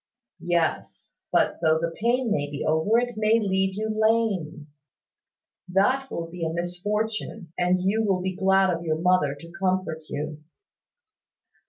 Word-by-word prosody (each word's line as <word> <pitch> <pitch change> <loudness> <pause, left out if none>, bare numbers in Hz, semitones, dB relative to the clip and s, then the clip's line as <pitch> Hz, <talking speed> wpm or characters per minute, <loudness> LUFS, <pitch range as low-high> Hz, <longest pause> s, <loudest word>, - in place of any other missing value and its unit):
"Yes; 175 -2 -1 0.2
but - - +2
though 160 -1 +4
the 165 +1 -2
pain 240 0 +1
may 145 -5 0
be 145 0 -4
over, 160 +9 +2
it 245 0 0
may 215 +1 +3
leave 190 -2 0
you 215 +2 -2
lame. 215 -8 0 1.0
That 255 +9 +2
will 170 - -4
be 170 0 -7
a 160 - -1
misfortune; 180 +1 -3
and 180 0 +1
you 210 +4 +1
will 195 -3 +1
be 185 0 -3
glad 190 -1 +3
of 170 - -7
your 155 -2 0
mother 170 -4 +2
to 165 +4 -13
comfort 185 -4 -1
you." 150 +1 -5
185 Hz, 150 wpm, -25 LUFS, 165-215 Hz, 1.0 s, though